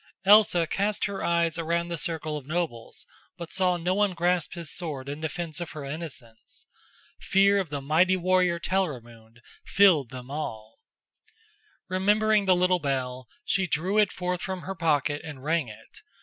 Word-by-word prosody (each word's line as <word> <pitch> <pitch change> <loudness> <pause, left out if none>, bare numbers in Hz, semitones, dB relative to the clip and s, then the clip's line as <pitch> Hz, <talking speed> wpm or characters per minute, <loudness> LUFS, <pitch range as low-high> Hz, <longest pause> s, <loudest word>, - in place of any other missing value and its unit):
Elsa 200 -4 +6
cast 200 +5 -1
her 200 -1 -4
eyes 170 0 +1
around 170 +1 -1
the 170 - -2
circle 155 -1 -2
of 140 -3 -7
nobles, 155 -8 -4 0.3
but 170 -1 -8
saw 185 -2 +1
no 175 +2 -1
one 205 -1 +1
grasp 175 -1 0
his 170 -2 -6
sword 150 -7 -5
in 145 +2 -6
defense 160 +1 -4
of 175 - -6
her 150 -2 -7
innocence. 140 -6 -9 0.5
Fear 200 +1 +3
of 185 -5 -3
the 145 -1 -4
mighty 170 +7 +3
warrior 180 -1 +2
Telramund 120 -12 -4 0.2
filled 175 - +4
them 125 +1 -9
all. 110 -7 -6 1.1
Remembering 210 +3 +2
the 185 -1 +4
little 180 0 +2
bell, 130 -3 -3 0.2
she 190 -1 +1
drew 180 +7 0
it 210 -2 +3
forth 180 -1 -3
from 190 -1 -4
her 195 - -5
pocket 150 -4 0
and 145 -5 -9
rang 160 -2 0
it. 105 - -13
170 Hz, 165 wpm, -26 LUFS, 145-185 Hz, 1.1 s, Elsa